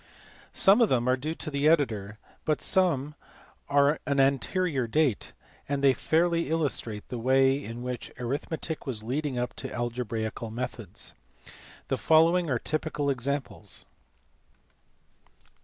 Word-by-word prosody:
Some 200 +5 +5
of 225 - +5
them 120 -1 +1
are 130 - +4
due 155 +5 -4
to 155 - -6
the 140 +1 +1
editor, 110 -10 +1 0.3
but 155 - +1
some 160 -7 +2 0.6
are 140 0 +5
of 155 - -3
an 140 -1 +1
anterior 135 +1 +1
date, 140 -2 +1 0.4
and 140 -1 -1
they 135 -1 +6
fairly 170 +3 +1
illustrate 140 -9 -1
the 125 - -4
way 135 +3 +3
in 115 +2 -7
which 125 -1 -5
arithmetic 145 +5 -4
was 110 -5 -1
leading 135 +3 -2
up 125 0 -2
to - - -5
algebraical 115 -2 -3
methods. 120 +3 -6 0.7
The - - 0
following 165 +2 +4
are 130 - +2
typical 150 +1 -1
examples. 135 -5 -3
140 Hz, 135 wpm, -28 LUFS, 120-155 Hz, 0.7 s, they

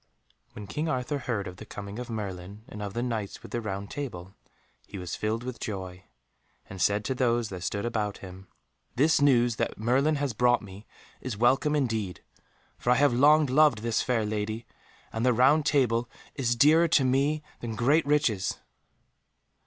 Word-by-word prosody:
When 105 - -8
King 150 +11 -3
Arthur 130 +1 -2
heard 115 -6 -3
of 90 0 -9
the 110 - -9
coming 100 +2 -7
of 125 - -6
Merlin 100 -2 -6
and 105 -5 -9
of 100 -1 -5
the 120 - -1
Knights 110 -5 -4
with - - -11
the 120 - -2
Round 100 -1 -5
Table 95 -10 -6 0.5
he - - -8
was 90 -3 -5
filled 110 +2 -2
with 125 -1 -6
joy, 95 -3 -6 0.6
and 95 -1 -8
said 105 +1 +2
to 130 - 0
those 120 -3 +1
that 90 -2 -7
stood 100 +4 -3
about 105 -3 -2
him, 95 0 -11 0.5
"This 150 +4 +3
news 120 -5 +3
that - - -2
Merlin 130 +8 +2
has 140 -3 -2
brought 120 +1 +2
me 100 +1 -12 0.3
is 130 -5 -5
welcome 130 +6 +3
indeed, 110 -9 -2 0.6
for - - -2
I 125 - +6
have 140 -1 +3
long 150 +5 +5
loved 140 -4 +3
this 115 -1 +1
fair 120 -4 0
lady, 110 +2 -3 0.5
and 115 - -2
the 125 0 +4
Round 140 +6 +4
Table 120 -4 +2 0.2
is 120 -3 0
dearer 155 +6 +5
to 150 -3 +3
me 140 +4 +1 0.2
than 115 -2 -5
great 140 +7 +2
riches." 125 -10 +1
120 Hz, 180 wpm, -27 LUFS, 105-135 Hz, 0.6 s, I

